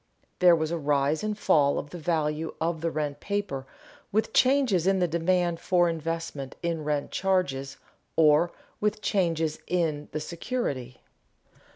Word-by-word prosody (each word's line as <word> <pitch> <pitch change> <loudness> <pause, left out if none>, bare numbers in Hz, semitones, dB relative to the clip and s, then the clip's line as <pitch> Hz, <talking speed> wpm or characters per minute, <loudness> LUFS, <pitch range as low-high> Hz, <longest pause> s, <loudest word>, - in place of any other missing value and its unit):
There 180 -1 +7
was 160 0 -1
a 170 - -1
rise 145 +2 +1
and 210 -1 -2
fall 140 -8 +3
of 145 - -5
the 175 - -7
value 155 -1 -1
of 165 -1 -1
the 165 - 0
rent 150 -3 -3
paper 195 -10 -3 0.4
with 220 +2 0
changes 255 - +3
in 195 0 +4
the 180 -1 +2
demand 170 +1 +1
for 175 -1 +3
investment 165 -4 -4
in 165 -2 -1
rent 150 -1 -1
charges 145 -8 0 0.4
or 155 +2 +5 0.3
with 210 0 -1
changes 165 -5 0
in 160 -4 -1
the 155 - -2
security. 150 - -4
165 Hz, 150 wpm, -27 LUFS, 150-180 Hz, 0.4 s, There